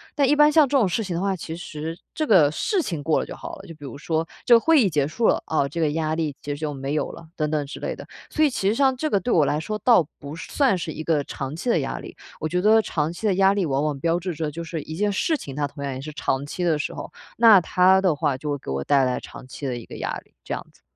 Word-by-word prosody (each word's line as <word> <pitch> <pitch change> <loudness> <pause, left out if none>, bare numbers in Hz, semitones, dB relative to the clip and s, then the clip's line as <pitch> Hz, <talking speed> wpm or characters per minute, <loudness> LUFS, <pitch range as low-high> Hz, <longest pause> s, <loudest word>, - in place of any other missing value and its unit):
但 280 -2 +3
一 290 - +4
般 295 0 +6
像 300 -2 +5
这 285 - -1
种 225 -7 +3
事 220 +6 -1
情 185 -4 -4
的 170 - -1
话， 195 0 0
其 165 -2 -6
实 160 -1 -6 0.2
这 310 - 0
个 180 - +6
事 370 - 0
情 165 - -4
过 155 0 +2
了 - - -2
就 - - -8
好 335 0 -8
了， - - -13
就 165 - -10
比 145 -1 -11
如 135 0 -8
说 160 +1 -1 0.2
这 240 - +7
个 - - +7
会 320 +2 +4
议 200 - +3
结 145 -4 +1
束 220 +9 0
了， - - +2
啊， 140 -3 +1
这 160 +5 -6
个 155 -2 +2
压 155 0 -1
力 155 -3 -2
其 145 - -9
实 - - -10
就 155 -2 -3
没 135 +1 -4
有 155 - -1
了， 165 - -12
等 155 -1 -1
等 150 -2 0
之 - - -8
类 - - -3
的。 - - -11 0.2
所 310 - +2
以 295 - +5
其 195 -6 -2
实 205 - +3
像 265 0 +3
这 310 +4 -1
个 200 - +3
对 235 +6 -2
我 155 -4 +4
来 145 +2 0
说 215 +7 -4
倒 230 - +5
不 140 +2 -8
算 240 - +1
是 165 -2 -4
一 155 - -6
个 155 -3 +1
长 135 +1 -5
期 245 - -3
的 - - +3
压 - - -4
力。 - - -10 0.2
我 155 - -2
觉 180 - 0
得 220 +1 +6
长 155 -4 -2
期 215 +5 -3
的 195 - +2
压 195 +1 +4
力 200 -2 0
往 135 +1 0
往 150 -3 -1
标 170 +3 +1
志 180 0 -4
着 155 -1 -3
就 170 +3 -6
是 165 -2 -5
一 155 - -7
件 205 +3 +1
事 315 - +1
情， 135 - -8
它 145 -1 -1
同 140 0 -9
样 140 -1 -3
也 130 - -6
是 155 +2 -7
长 135 -1 -1
期 180 +5 -4
的 165 -3 +2
时 - - -3
候， - - -7 0.3
那 220 -5 +8
它 185 +2 +4
的 185 -5 +2
话 145 -2 0
就 150 +2 -5
会 145 - -1
给 130 - -7
我 70 +1 -2
带 140 - +3
来 125 - -1
长 - - -11
期 135 +2 -6
的 125 - -2
一 115 - -9
个 - - -10
压 - - -3 0.2
力， - - -32
这 - - -5
样 - - -7
子。 - - -26
165 Hz, 340 characters per minute, -24 LUFS, 150-210 Hz, 0.3 s, 那